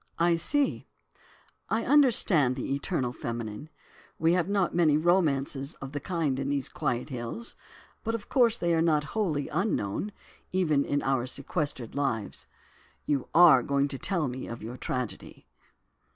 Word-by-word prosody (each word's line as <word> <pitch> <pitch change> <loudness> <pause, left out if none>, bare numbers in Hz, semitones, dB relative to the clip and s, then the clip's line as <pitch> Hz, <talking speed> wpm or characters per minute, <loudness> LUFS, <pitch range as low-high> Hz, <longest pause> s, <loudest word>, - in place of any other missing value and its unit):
"I 170 +1 +3
see, 280 - 0 0.8
I 225 +1 0
understand, 215 - +4
the 135 +1 -3
'eternal 140 -3 -1
feminine'; 115 +4 -5 0.5
we 165 +2 +3
have 180 0 +1
not 200 -3 +1
many 160 -4 +4
romances 150 -4 +1
of 135 0 -8
the 145 - -3
kind 155 -6 -1
in 135 0 -2
these 140 -2 -1
quiet 120 +4 -2
hills, 125 - -6 0.5
but 225 0 -1
of 220 - -7
course 235 -3 +3
they 170 -4 0
are 165 - +2
not 155 -3 +2
wholly 165 -10 0
unknown, 175 - -1 0.4
even 155 -6 +2
in 145 0 -1
our 130 -2 0
sequestered 140 -3 -3
lives. 125 -7 -2 0.6
You 140 -3 -1
are 165 -7 +8
going 140 +2 +1
to 135 -2 -6
tell 170 -7 0
me 130 +1 -5
of 115 -2 -7
your 115 +3 -6
tragedy." 125 -2 -5
145 Hz, 150 wpm, -28 LUFS, 130-175 Hz, 0.8 s, are